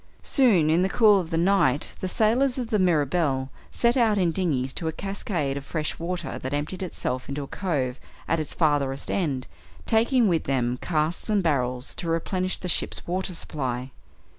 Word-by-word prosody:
Soon, 200 - +4
in 165 +2 +3
the 190 - +2
cool 210 -2 +5
of 170 -3 -4
the 165 - -1
night, 170 -6 +2
the 185 - -2
sailors 240 +7 +2
of 245 -2 -4
the 215 - +2
Mirabelle 150 -5 +1 0.2
set 235 0 +2
out 225 -5 +3
in 180 -3 +2
dinghies 145 -8 -1
to 165 - -4
a - - 0
cascade 175 -7 -2
of 140 - -5
fresh 155 +1 -3
water 175 +1 -4
that 130 +2 -3
emptied 150 +6 -3
itself 130 -8 -3
into 140 +1 -3
the - - -4
cove 135 -7 -2 0.3
at 165 - +1
its 155 - -3
farther 145 -4 +1
end, 140 -9 -1 0.4
taking 230 +1 +3
with 170 -4 +1
them 125 -2 0
casks 160 +4 -1
and 205 -3 +2
barrels 125 -5 0
to 170 - -5
replenish 185 +3 -1
the 180 - -6
ship's - - -2
water 185 +1 -2
supply. 130 -5 -3
165 Hz, 185 wpm, -25 LUFS, 140-195 Hz, 0.4 s, cool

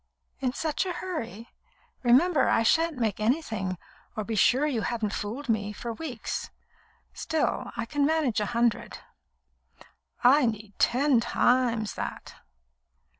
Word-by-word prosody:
"In 260 -2 0
such 310 +6 -2
a 360 - -2
hurry? 240 - -5 0.5
Remember 265 +5 +4
I 225 - +3
shan't 325 +5 +2
make 220 -5 -1
anything, 215 - -1 0.4
or 215 - -1
be 225 - -4
sure 250 +6 +4
you 260 -7 0
haven't 220 -2 -2
fooled 235 +8 -4
me, 210 -3 0
for 235 +2 -5
weeks. 255 -4 -5 0.6
Still, 320 -1 -1
I 230 - -2
can 290 +4 -1
manage 300 -6 +2
a 210 - -1
hundred." 235 -1 0 1.3
"I 260 +1 +6
need 215 -2 -4
ten 260 +1 +3
times 235 -2 +1
that." - - -6
240 Hz, 130 wpm, -27 LUFS, 220-290 Hz, 1.3 s, I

